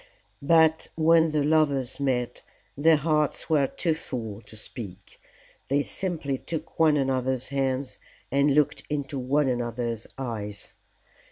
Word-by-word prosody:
But 160 +2 +4
when 165 0 +4
the 150 -1 +1
lovers 145 -4 +1
met, 125 -3 -1 0.3
their 160 +3 +5
hearts 150 +1 0
were 145 -3 +4
too 165 +3 -1
full 115 -9 -6
to - - -11
speak. 100 -3 -9 0.5
They 140 +1 +2
simply 155 -9 -3
took 165 0 -6
one 155 -2 +5
another's 130 -2 0
hands 135 -1 -2 0.3
and 140 +1 +3
looked 150 -1 +2
into 145 -2 -3
one 140 +3 +1
another's 120 -2 -2
eyes. 105 -6 -5
140 Hz, 125 wpm, -26 LUFS, 125-155 Hz, 0.5 s, their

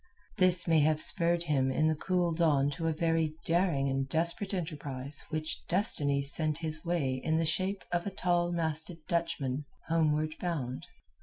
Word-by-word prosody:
This 180 -2 +4
may 165 -1 +4
have 155 +1 +2
spurred 170 +1 +2
him 135 -5 +1
in 155 +4 +1
the 160 - +2
cool 175 +2 0
dawn 150 -4 +2
to 165 +2 -3
a - - +2
very 160 -1 0
daring 170 -5 +1
and 135 0 -2
desperate 170 +6 +1
enterprise 145 -6 -4
which 155 0 -3
Destiny 145 -7 +2
sent 155 +2 +4
his 155 -2 -4
way 140 -7 -1
in 160 0 +1
the 165 - +1
shape 185 +5 -1
of 175 +2 -1
a - - 0
tall 175 -2 0
masted 165 0 -1
Dutchman 165 -6 -2 0.2
homeward 155 -1 +1
bound. 140 -8 -4
160 Hz, 165 wpm, -30 LUFS, 145-170 Hz, 0.2 s, This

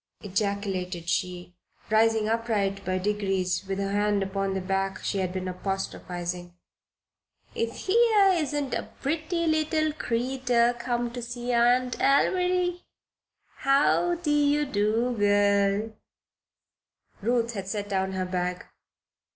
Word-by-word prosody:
ejaculated 195 -3 -2
she, 180 0 -2 0.4
rising 220 0 +3
upright 215 -4 0
by 185 0 -1
degrees 195 -2 -1
with 195 0 -2
her 195 0 -2
hand 205 0 +1
upon 195 0 -2
the - - 0
back 195 +1 -1
she 200 - -1
had 185 -1 -1
been 185 0 -4
apostrophizing. 180 -2 -4 1.0
"If 230 0 -3
here 430 -1 +5
isn't 295 -5 -1
a - - -3
pretty 320 +4 -1
little 310 -1 +1
creeter 245 -2 +1
come 240 -1 -1
to 245 0 -6
see 240 +1 -4
her 235 -1 +3
Aunt 250 +1 +2
Alviry. 360 +5 +2 0.8
How 285 +5 +3
de 295 -3 +2
do, 230 0 0
girl?" 205 0 +2 1.3
Ruth 235 +2 +1
had 195 -3 -5
set 205 0 -3
down 190 -1 -1
her 185 -1 -1
bag. 180 0 -3
215 Hz, 120 wpm, -27 LUFS, 195-265 Hz, 1.3 s, here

